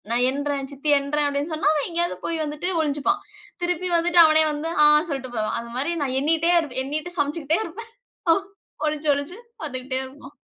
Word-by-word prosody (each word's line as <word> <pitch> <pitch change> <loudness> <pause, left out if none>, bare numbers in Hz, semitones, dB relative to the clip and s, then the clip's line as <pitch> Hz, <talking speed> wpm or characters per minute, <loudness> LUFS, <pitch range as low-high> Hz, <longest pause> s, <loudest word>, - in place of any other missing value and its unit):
நான் 240 +1 +2
என்றேன் 280 0 -2
சித்தி 280 +2 -4
எறேன் 285 +1 0
அப்டின்னு 285 +3 -2
சொன்னா, 310 - 0
அவன் 300 -2 -1
எங்கேயாவது 345 +1 -1
போய் 330 -1 -1
வந்துட்டு 300 +3 -4
ஒழிஞ்சுப்பான். 310 +6 0 0.4
திருப்பி 355 +1 -1
வந்துட்டு 345 +1 +3
அவனே 315 0 +5
வந்து 300 +2 -3 0.2
ஆ - - +9 0.2
சொல்ட்டு 265 -3 -5
போவான். 215 -1 -1
அது 235 0 -8
மாரி 280 +6 0
நான் 260 -2 -2
எண்ணிகிட்டே 325 +4 +2
இருப் 295 -7 -5
எண்ணிிட்டு 310 +6 -4
சமைச்சுக்கிட்டே 295 +2 0
இருப்பேன். 440 +7 -9 0.9
ஒளிஞ்சு, 305 0 -2
ஒளிஞ்சு 285 +5 -4 0.3
வந்துக்கிட்டே 260 -2 -3
இருப்பான். 270 +1 -13
295 Hz, 170 wpm, -23 LUFS, 275-330 Hz, 0.9 s, ஆ